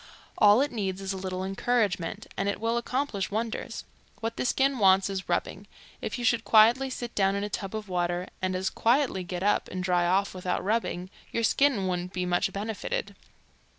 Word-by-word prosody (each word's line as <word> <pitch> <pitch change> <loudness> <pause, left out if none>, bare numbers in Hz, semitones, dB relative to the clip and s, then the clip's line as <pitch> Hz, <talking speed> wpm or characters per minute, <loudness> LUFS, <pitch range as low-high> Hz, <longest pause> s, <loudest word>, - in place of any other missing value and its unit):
All 210 +3 +7
it 285 - 0
needs 195 -5 -2
is 195 0 -3
a - - -5
little 185 0 -4
encouragement 195 -3 -1
and 195 +1 0
it 200 - -2
will 230 +1 0
accomplish 235 -4 -1
wonders. 225 +2 -3 0.4
What 225 0 -3
the - - -2
skin 270 +1 +2
wants 195 0 +5
is 190 -1 -5
rubbing. - - -2 0.3
If - - -3
you 240 - -3
should 230 -1 +3
quietly 230 +5 +5
sit 240 -2 -5
down 195 -1 +2
in 200 - -1
a 205 - -3
tub 195 +1 -4
of 215 -1 -5
water 175 -1 -1 0.2
and 185 0 -1
as 190 +1 -1
quietly 240 -5 +2
get 180 0 -5
up 205 - +2
and 185 0 -4
dry 180 -1 +2
off 195 +3 +1
without 180 -1 -2
rubbing, 190 -3 -1 0.2
your 230 - -1
skin 250 -4 +3
wouldn't 180 0 -3
be 180 0 -1
much 175 0 +1
benefited. 220 - -4
200 Hz, 195 wpm, -28 LUFS, 185-230 Hz, 0.4 s, All